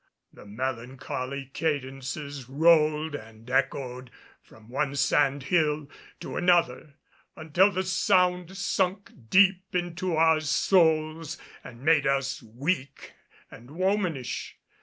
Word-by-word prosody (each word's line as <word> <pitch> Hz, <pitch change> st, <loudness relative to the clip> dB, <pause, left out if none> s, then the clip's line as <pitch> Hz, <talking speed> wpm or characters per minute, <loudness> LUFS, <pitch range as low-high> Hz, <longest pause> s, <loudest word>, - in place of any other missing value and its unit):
The -, -, -14 dB
melancholy 130 Hz, +3 st, -5 dB
cadences 140 Hz, -2 st, -4 dB
rolled 155 Hz, +1 st, +3 dB
and 115 Hz, -3 st, -10 dB
echoed 130 Hz, -1 st, -1 dB, 0.3 s
from 110 Hz, -1 st, -19 dB
one 140 Hz, +3 st, -2 dB
sand 140 Hz, 0 st, +2 dB
hill 150 Hz, -1 st, +1 dB, 0.3 s
to -, -, -6 dB
another, 170 Hz, -5 st, +1 dB, 0.4 s
until 165 Hz, +5 st, +3 dB
the 185 Hz, 0 st, -1 dB
sound 180 Hz, 0 st, +1 dB
sunk 195 Hz, 0 st, -1 dB, 0.2 s
deep 190 Hz, 0 st, +3 dB
into 175 Hz, 0 st, -2 dB
our 160 Hz, 0 st, +4 dB
souls 160 Hz, -1 st, +1 dB, 0.3 s
and 125 Hz, 0 st, -12 dB
made 155 Hz, -2 st, +3 dB
us 135 Hz, 0 st, 0 dB
weak 135 Hz, +5 st, -4 dB, 0.4 s
and 120 Hz, +3 st, -13 dB
womanish. 180 Hz, -, -2 dB
150 Hz, 105 wpm, -27 LUFS, 130-175 Hz, 0.4 s, our